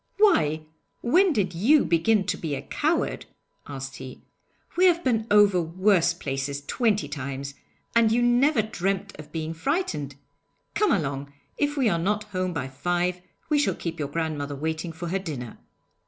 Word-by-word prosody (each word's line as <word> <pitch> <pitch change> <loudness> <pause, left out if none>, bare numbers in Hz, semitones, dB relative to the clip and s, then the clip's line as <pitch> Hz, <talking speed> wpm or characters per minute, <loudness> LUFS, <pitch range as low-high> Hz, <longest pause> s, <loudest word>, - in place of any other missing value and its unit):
'Why, 155 - +3 0.4
when 355 +10 +4
did 195 - 0
you 255 - +4
begin 180 +5 +2
to - - 0
be 155 -4 -3
a - - -5
coward!' - - -1 0.4
asked 135 -1 -6
he. 130 -1 -10 0.5
'We 365 - +4
have 345 -1 +3
been 225 -3 +1
over 205 -3 +5
worse 175 +1 +2
places 140 -3 -4
twenty 220 - +1
times, 140 0 -5 0.4
and 230 -2 +5
you 240 +2 +3
never 240 +1 +3
dreamed 195 -1 -2
of 150 0 -10
being 160 0 -3
frightened! 160 - -2 0.6
Come 420 -3 +2
along! 140 -6 -1 0.3
If 290 0 0
we 260 -4 +3
are 170 -5 +2
not 205 +5 0
home 185 0 -1
by 150 -6 -3
five 175 +6 -1 0.3
we 300 -2 +3
shall 290 - +1
keep 165 -2 -5
your 145 -2 -2
grandmother 150 -3 -3
waiting 160 +3 -3
for 165 +1 -6
her 195 +3 0
dinner.' 140 - -6
175 Hz, 165 wpm, -25 LUFS, 150-220 Hz, 0.6 s, over